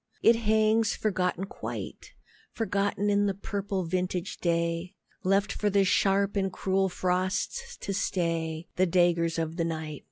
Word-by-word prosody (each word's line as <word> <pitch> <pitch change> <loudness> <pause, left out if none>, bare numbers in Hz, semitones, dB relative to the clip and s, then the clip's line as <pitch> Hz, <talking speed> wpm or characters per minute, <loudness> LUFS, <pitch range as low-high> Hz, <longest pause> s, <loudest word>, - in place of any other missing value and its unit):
It 230 - +7
hangs 220 0 +2
forgotten 185 -3 -1
quite, - - -7 0.4
Forgotten 205 -2 0
in 205 0 +3
the 195 - -1
purple 200 -1 -3
vintage 180 +1 -2
day, 170 +1 -1 0.3
Left 195 +2 +2
for 210 - 0
the 200 -1 +3
sharp 200 +1 +2
and 195 -1 0
cruel 190 +1 +1
frosts 185 - -1
to 200 - -4
slay, 165 -4 -1
The 185 +1 +4
daggers 170 -1 +2
of 165 +1 -2
the 170 - +1
night. 160 -3 -4
190 Hz, 140 wpm, -28 LUFS, 170-200 Hz, 0.4 s, It